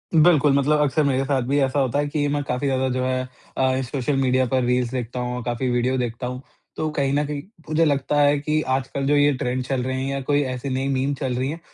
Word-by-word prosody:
बिल्कुल, 155 -3 +5
मतलब 145 +2 +3
अक्सर 150 +1 +2
मेरे 135 -1 +1
साथ 135 -1 +1
भी 140 +2 +2
ऐसा 135 +1 +1
होता 135 +1 +1
है 145 - 0
कि 145 0 -1
मैं 145 0 0
काफ़ी 135 +1 -2
ज़्यादा 130 0 +1
जो 130 0 -1
है 130 0 0 0.4
अ, 130 0 +2
सोशल 135 +2 -2
मीडिया 130 0 +2
पर 130 +1 +1
रील्स 125 -1 +1
देखता 125 -1 -4
हूँ, 125 0 -3
काफ़ी 120 +1 -2
वीडियो 125 +2 +1
देखता 120 0 -3
हूँ। 125 +1 -5 0.4
तो 155 - -1
कहीं 140 -3 0
न 145 +1 +1
कहीं 145 0 -4 0.3
मुझे 155 +1 +2
लगता 145 0 +1
है 145 0 +4
कि 155 +1 0
आजकल 135 +1 -3
जो 145 - +3
ये 145 0 +4
ट्रेंड 125 +1 -1
चल 130 0 -1
रहे 130 +1 -2
हैं 135 - -2
या 140 - -2
कोई 145 0 +3
ऐसी 125 +2 -5
नई 130 +1 -1
मीम 135 +1 0
चल 130 -2 -2
रही 130 +2 -1
है 165 - -5
135 Hz, 250 wpm, -23 LUFS, 130-145 Hz, 0.4 s, बिल्कुल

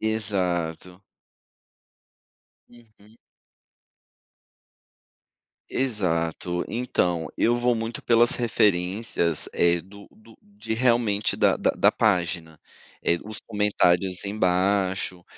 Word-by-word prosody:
Exato. 90 -4 -2 1.7
Uhum. 110 -2 -21 2.5
Exato. 90 -7 -1
Então, 90 -9 -1
eu 120 - +2
vou 120 0 +1
muito 115 +1 -4
pelas 120 0 +4
referências, 95 -6 0
eh, 85 0 +2
do 100 +3 -15
do 110 +1 -19
de 205 - -6
realmente 115 -4 +1
da - - +3
da - - +1
da - - +3
página, 85 -6 -1 0.5
eh, 85 0 +2
os 110 0 -7
comentários 95 -3 +1
embaixo, 95 -2 0
100 Hz, 85 wpm, -24 LUFS, 90-115 Hz, 2.5 s, pelas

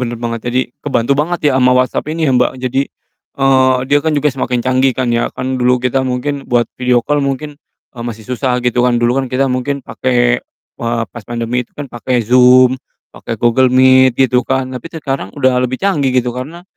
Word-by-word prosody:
bener 120 -1 -3
banget. 115 -1 -4
Jadi, 125 +1 +1 0.2
kebantu 135 -2 0
banget 155 -1 0
ya - - 0
sama 125 0 +4
WhatsApp 125 +2 0
ini 160 -1 -1
ya, 135 - +2
Mbak. 125 0 +2
Jadi, 130 +2 0 0.6
eee, 130 -1 +3
dia 145 - +5
kan 160 -1 0
juga 150 +1 +2
semakin 125 -2 -2
canggih 130 0 +2
kan 125 -2 -1
ya, 120 0 0
kan 130 0 -3
dulu 125 0 +2
kita 130 +1 0
mungkin 135 +3 -3
buat 120 -1 +1
video 125 -1 +2
call 145 0 0
mungkin, 145 +2 -4 0.4
eee, 120 - -7
masih 115 -2 -7
susah 125 0 -1
gitu 125 0 +1
kan, 125 - +2
dulu 120 +3 +2
kan 130 - -4
kita 130 +2 0
mungkin 130 +2 -2
pake, 125 -1 0 0.4
eee, 115 -1 -1
pas 115 - -10
pandemi 120 +1 -3
itu - - -43
kan, 145 -3 -8
pake 120 0 -1
Zoom, 125 +2 +5 0.3
pake 115 - -6
Google 120 +2 +4
Meet, 130 -1 +5
gitu 125 -1 +1
kan, 130 -1 -1
tapi 130 +5 -7
sekarang 135 - -4
udah 130 -3 +2
lebih 125 +3 -2
canggih, 145 -10 +1
gitu. 125 -1 +1
Karena 145 +8 -7
130 Hz, 205 wpm, -15 LUFS, 125-135 Hz, 0.6 s, dia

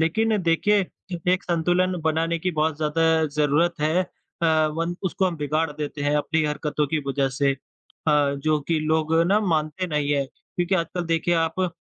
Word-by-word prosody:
लेकिन 220 +7 +2
देखिए, 175 +5 +3 0.5
एक 185 - 0
संतुलन 175 +2 +1
बनाने 165 +1 +1
की 180 +3 -1
बहुत 155 -2 0
ज़्यादा 160 +1 +2
ज़रूरत 150 +4 +2
है 160 +4 +2
अ, 160 -3 -1
वन 165 +2 -2
उसको 190 0 0
हम 175 - -2
बिगाड़ 155 +1 -1
देते 145 0 -5
हैं 145 +1 +1
अपनी 155 +1 0
हरकतों 150 0 -1
की 155 +2 -1
वजह 135 0 +1
से 140 -1 +3
अ, - - -7 0.8
जो 150 +2 0
कि 165 -1 +2
लोग 155 +1 +1
ना 205 +3 +3
मानते 165 -2 -1
नहीं 150 -3 0
हैं, 140 -1 +1
क्योंकि 175 +6 -3
आजकल 175 0 -1
देखिए 165 +1 +1
आप 160 +3 -5
अ, 185 - +2
160 Hz, 180 wpm, -24 LUFS, 150-175 Hz, 0.8 s, देखिए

